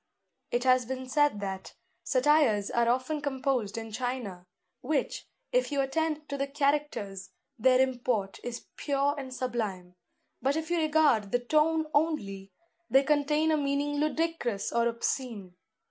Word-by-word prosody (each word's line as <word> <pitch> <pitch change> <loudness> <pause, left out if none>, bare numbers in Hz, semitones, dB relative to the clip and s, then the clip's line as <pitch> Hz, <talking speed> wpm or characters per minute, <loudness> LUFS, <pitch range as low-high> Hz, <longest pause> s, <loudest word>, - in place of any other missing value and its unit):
It 240 0 0
has 255 -2 +4
been 260 0 -4
said 290 -5 +2
that 190 -1 -5 0.3
"Satires 255 -7 +3
are 235 0 +2
often 260 +5 0
composed 265 -6 -1
in 225 -1 -6
China, 215 -7 -4 0.3
which, 285 +2 -2 0.2
if - - +1
you 285 - 0
attend 305 +2 -1
to 280 -1 -4
the 275 - 0
characters, 275 -10 -1 0.3
their 255 +3 +5
import 245 -6 0
is 245 -1 -6
pure 280 0 +1
and 270 -3 -6
sublime; 215 -8 -3 0.5
but 275 +2 +1
if 320 +1 -3
you 345 - +2
regard 300 -10 +3
the - - +4
tone 310 +5 +2
only, 200 -12 0 0.4
they 270 +1 +5
contain 300 +2 +2
a 310 - +3
meaning 285 0 0
ludicrous 305 -8 -1
or 235 0 +2
obscene. 230 -4 -3
260 Hz, 145 wpm, -29 LUFS, 230-295 Hz, 0.5 s, their